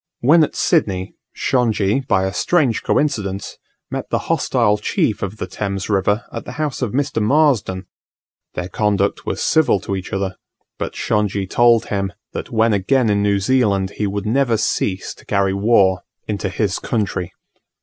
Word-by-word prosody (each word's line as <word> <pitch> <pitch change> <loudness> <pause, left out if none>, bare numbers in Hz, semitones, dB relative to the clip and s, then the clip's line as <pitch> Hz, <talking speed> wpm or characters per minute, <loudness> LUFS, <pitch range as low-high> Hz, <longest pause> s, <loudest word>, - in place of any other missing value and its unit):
When 155 +6 +6
at - - -2
Sydney, 95 - +1 0.2
Shongi, 115 -3 +1
by 95 -8 +2
a 95 - -2
strange 135 - +1
coincidence, 100 -9 -1 0.3
met - - -4
the - - +1
hostile 105 -4 +2
chief 105 0 0
of 100 +2 -4
the - - -3
Thames 100 0 -4
River 105 +2 +1
at - - -5
the 125 - -8
house 150 -2 -3
of 125 -5 -1
Mr. 140 -2 -1
Marsden: 110 -7 +2 0.7
their 90 - -3
conduct 100 +1 0
was - - -2
civil 155 -10 +3
to 100 - -3
each 95 -1 -6
other; 95 -1 -2 0.4
but - - -4
Shongi 100 -2 0
told 120 +3 +4
him 100 -2 -1 0.2
that - - -5
when 110 -1 +2
again 110 +4 +2
in 100 0 +2
New 100 -1 +2
Zealand 100 -4 +1
he 105 - 0
would 100 +1 -3
never 120 0 +2
cease 95 -3 -1
to - - -19
carry 100 -1 +1
war 100 -3 +3 0.3
into 100 -2 -2
his 95 0 -1
country. 95 -5 -2
105 Hz, 165 wpm, -19 LUFS, 95-120 Hz, 0.7 s, When